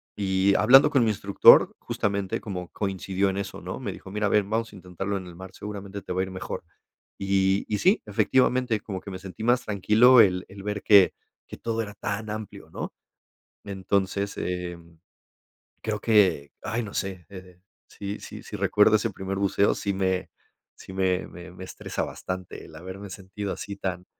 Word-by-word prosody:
Y 95 Hz, 0 st, +2 dB
hablando 135 Hz, +6 st, +7 dB
con 135 Hz, -5 st, +3 dB
mi 115 Hz, -, +2 dB
instructor, 100 Hz, -1 st, +6 dB
justamente, 100 Hz, -2 st, -2 dB
como 90 Hz, -4 st, -6 dB
coincidió 95 Hz, -1 st, -1 dB
en 95 Hz, -, -3 dB
eso, 100 Hz, -, -5 dB
¿no? -, -, -6 dB
Me -, -, -3 dB
dijo: 95 Hz, -, -11 dB
"Mira, 105 Hz, 0 st, 0 dB
a -, -, 0 dB
ver, 105 Hz, -1 st, +3 dB
vamos 110 Hz, +2 st, -2 dB
a -, -, -13 dB
intentarlo 95 Hz, +2 st, -4 dB
en 95 Hz, -, -8 dB
el 85 Hz, -, -11 dB
mar, 95 Hz, +1 st, -10 dB
seguramente 100 Hz, -1 st, -7 dB
te 90 Hz, -, -5 dB
va 90 Hz, -, 0 dB
a -, -, +2 dB
ir 95 Hz, -, -6 dB
mejor". 95 Hz, -, -5 dB, 0.6 s
Y 95 Hz, 0 st, +2 dB
y 105 Hz, -, -1 dB
sí, 190 Hz, +4 st, +4 dB
efectivamente, 120 Hz, +2 st, +2 dB
como 95 Hz, -3 st, -6 dB
que 100 Hz, -, -8 dB
me 95 Hz, -, -6 dB
sentí 95 Hz, +3 st, -9 dB
más 120 Hz, +2 st, +3 dB
tranquilo 110 Hz, +5 st, +6 dB
el 90 Hz, -3 st, +2 dB
el 100 Hz, 0 st, -11 dB
ver 105 Hz, 0 st, -3 dB
que 100 Hz, -3 st, +7 dB, 0.3 s
que -, -, -9 dB
todo 115 Hz, -1 st, -2 dB
era 105 Hz, -2 st, -6 dB
tan 105 Hz, +1 st, -4 dB
amplio, 110 Hz, -1 st, -7 dB
¿no? -, -, -5 dB, 0.7 s
Entonces, 100 Hz, 0 st, -1 dB
em, 85 Hz, -2 st, -5 dB, 0.8 s
creo 105 Hz, -1 st, -3 dB
que, 100 Hz, -10 st, +3 dB
ay, 115 Hz, +1 st, -2 dB
no 105 Hz, -, -8 dB
sé, 95 Hz, -3 st, -4 dB
eh 90 Hz, -2 st, -12 dB, 0.3 s
sí 100 Hz, 0 st, -6 dB
sí -, -, -9 dB
sí -, -, -7 dB
recuerdo 105 Hz, +1 st, +4 dB
ese 110 Hz, +1 st, -2 dB
primer 95 Hz, 0 st, -4 dB
buceo, 100 Hz, 0 st, +2 dB
sí 100 Hz, -1 st, -2 dB
me 95 Hz, -1 st, -1 dB, 0.5 s
sí -, -, -12 dB
me 95 Hz, -1 st, +1 dB
me 90 Hz, +1 st, -11 dB
me 90 Hz, +1 st, -10 dB
estresa 95 Hz, -, -4 dB
bastante 95 Hz, -1 st, -6 dB
el -, -, -14 dB
haberme 95 Hz, +5 st, -8 dB
sentido 95 Hz, +1 st, -5 dB
así 100 Hz, -1 st, -7 dB
tan 90 Hz, -2 st, -4 dB
100 Hz, 190 wpm, -26 LUFS, 95-105 Hz, 0.8 s, hablando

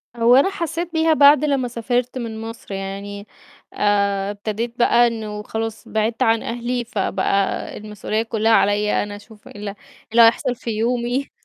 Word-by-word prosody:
هو 235 Hz, +1 st, +5 dB
أنا 275 Hz, +8 st, +5 dB
حسيت 340 Hz, -2 st, -4 dB
بيها 320 Hz, 0 st, +3 dB
بعد 285 Hz, 0 st, +6 dB
لمّا 275 Hz, -4 st, 0 dB
سافِرت 245 Hz, +2 st, -2 dB
من 225 Hz, -3 st, -5 dB
مصر 225 Hz, -2 st, -8 dB
يعني، 200 Hz, +1 st, -6 dB, 0.5 s
آآ، 200 Hz, -1 st, +1 dB
ابتديت 220 Hz, +4 st, -5 dB
بقى 240 Hz, 0 st, +5 dB
إنه 215 Hz, -2 st, -5 dB
خلاص 225 Hz, 0 st, -5 dB
بعِدت 220 Hz, +1 st, 0 dB
عن 225 Hz, 0 st, +2 dB
أهلي، 240 Hz, +1 st, -3 dB
فبقى 200 Hz, -2 st, -1 dB
المسؤولية 210 Hz, +1 st, -3 dB
كلّها 225 Hz, 0 st, 0 dB
عليَّ 210 Hz, -1 st, +3 dB
أنا 205 Hz, 0 st, -7 dB
أشوف 210 Hz, +1 st, -15 dB
إيه -, -, -13 dB
ال 205 Hz, 0 st, -7 dB
إيه 200 Hz, -, -5 dB, 0.4 s
اللي 235 Hz, +1 st, +5 dB
هيحصل 245 Hz, +3 st, +4 dB
في 235 Hz, -, -7 dB
يومي 240 Hz, +4 st, -1 dB
225 Hz, 165 wpm, -21 LUFS, 210-245 Hz, 0.5 s, بعد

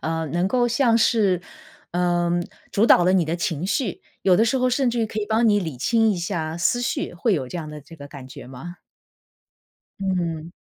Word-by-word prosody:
呃， 160 Hz, 0 st, -2 dB
能 175 Hz, +5 st, 0 dB
够 245 Hz, +2 st, +2 dB
像 235 Hz, -1 st, +2 dB
是， 205 Hz, -6 st, +2 dB, 0.5 s
嗯， 175 Hz, 0 st, +1 dB, 0.3 s
主 210 Hz, +3 st, +3 dB
导 175 Hz, -, +6 dB
了 185 Hz, -, +3 dB
你 185 Hz, -3 st, +3 dB
的 160 Hz, +2 st, -2 dB
情 170 Hz, -2 st, -2 dB
绪， 205 Hz, -, -2 dB, 0.2 s
有 185 Hz, -2 st, +4 dB
的 220 Hz, -, +4 dB
时 240 Hz, +3 st, +1 dB
候 255 Hz, 0 st, +2 dB
甚 250 Hz, 0 st, +1 dB
至 240 Hz, -, -3 dB
于 225 Hz, -, +1 dB
可 215 Hz, 0 st, -4 dB
以 205 Hz, -, -3 dB
帮 225 Hz, +2 st, +2 dB
你 205 Hz, -1 st, +3 dB
理 160 Hz, -8 st, -5 dB
清 225 Hz, -, +2 dB
一 200 Hz, -, -1 dB
下 170 Hz, -3 st, -3 dB
思 205 Hz, +8 st, +1 dB
绪， 245 Hz, -, -2 dB
会 205 Hz, +5 st, +1 dB
有 140 Hz, -6 st, -2 dB
这 175 Hz, -, -6 dB
样 160 Hz, -3 st, -5 dB
的 150 Hz, 0 st, -8 dB
这 165 Hz, +4 st, -15 dB
个 145 Hz, -3 st, -11 dB
感 140 Hz, -3 st, -10 dB
觉 130 Hz, -, -11 dB
吗？ 155 Hz, +9 st, -10 dB, 1.2 s
嗯。 170 Hz, -4 st, -2 dB
180 Hz, 230 characters per minute, -23 LUFS, 165-220 Hz, 1.2 s, 导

